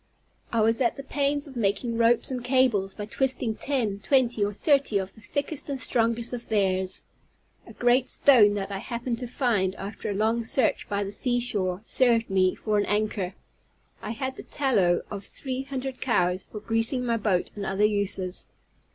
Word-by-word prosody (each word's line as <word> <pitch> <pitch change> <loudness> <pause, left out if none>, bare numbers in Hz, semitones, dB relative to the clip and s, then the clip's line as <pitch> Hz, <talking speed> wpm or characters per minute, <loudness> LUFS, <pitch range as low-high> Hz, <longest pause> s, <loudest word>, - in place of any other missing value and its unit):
I 230 - +1
was 225 +3 +2
at 235 - +2
the 275 - -8
pains 285 +1 -1
of 270 - -12
making 230 +1 0
ropes 230 +2 +3
and 250 -2 -3
cables 245 -7 +2
by 210 - -5
twisting 255 0 -1
ten, 225 -5 -2
twenty, 245 -2 +2
or 205 - 0
thirty 275 0 +2
of 190 0 -4
the 220 - -17
thickest 285 +4 -4
and 275 -2 -3
strongest 235 0 +2
of 240 -1 -6
theirs. 190 -3 +1 0.6
A - - -11
great 245 +1 +2
stone 215 -7 +6
that 200 0 -4
I 195 - -3
happened 235 +2 -4
to 250 - -4
find, 220 -7 0
after 200 +2 -6
a 200 - -2
long 225 +3 +1
search 245 +2 0
by 205 -1 -1
the 200 - -5
sea 245 +3 +2
shore, 190 -6 -2
served 230 -2 +2
me 185 -1 +3
for 210 -1 0
an 205 - +1
anchor. 205 -3 -1 0.7
I - - -6
had 260 +3 -4
the - - -6
tallow 205 -11 +1
of 200 -1 -5
three 260 +4 -5
hundred 265 -1 -5
cows 180 -6 +1
for 210 - -8
greasing 225 +4 0
my 235 -1 +1
boat 200 -5 0
and 205 - -5
other 195 +2 +1
uses. 200 -3 -2
225 Hz, 185 wpm, -26 LUFS, 200-255 Hz, 0.7 s, stone